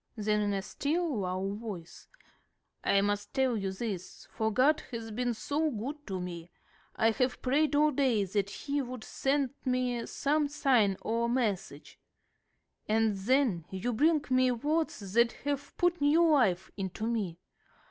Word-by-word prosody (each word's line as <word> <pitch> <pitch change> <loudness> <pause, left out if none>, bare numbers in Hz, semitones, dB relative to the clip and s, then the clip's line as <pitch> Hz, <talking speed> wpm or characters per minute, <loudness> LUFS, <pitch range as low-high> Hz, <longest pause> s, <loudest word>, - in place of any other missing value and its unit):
Then 210 0 +1
in 205 -1 0
a 195 -1 -2
still 315 - -1
lower 190 0 -2
voice, 205 -6 -8 0.8
"I 200 - +3
must 205 +3 -2
tell 265 -3 +2
you 195 -3 -2
this, 190 -3 -6
for 220 0 -1
God 275 +7 +4
has 230 -3 -6
been 240 +2 -1
so 300 +7 0
good 285 +5 -5
to 190 -2 -3
me. 175 -1 -6 0.5
I 225 +1 +3
have 250 +3 0
prayed 290 +3 +2
all 300 +1 +4
day 255 -7 +2
that 200 +1 -1
He 285 +7 -2
would 250 -3 -6
send 275 -1 0
me 250 -2 0
some 295 +1 +1
sign 250 -9 +2
or 230 +1 0
message. 205 - -2 0.9
And 220 -1 +2
then 210 - +1
you 190 +6 -2
bring 305 +5 +3
me 255 0 +4
words 250 - -1
that 235 +1 +4
have 285 0 -3
put 350 -2 +1
new 315 +4 +5
life 195 -11 +2
into 195 +2 -4
me. 210 -8 -2
235 Hz, 155 wpm, -30 LUFS, 205-280 Hz, 0.9 s, new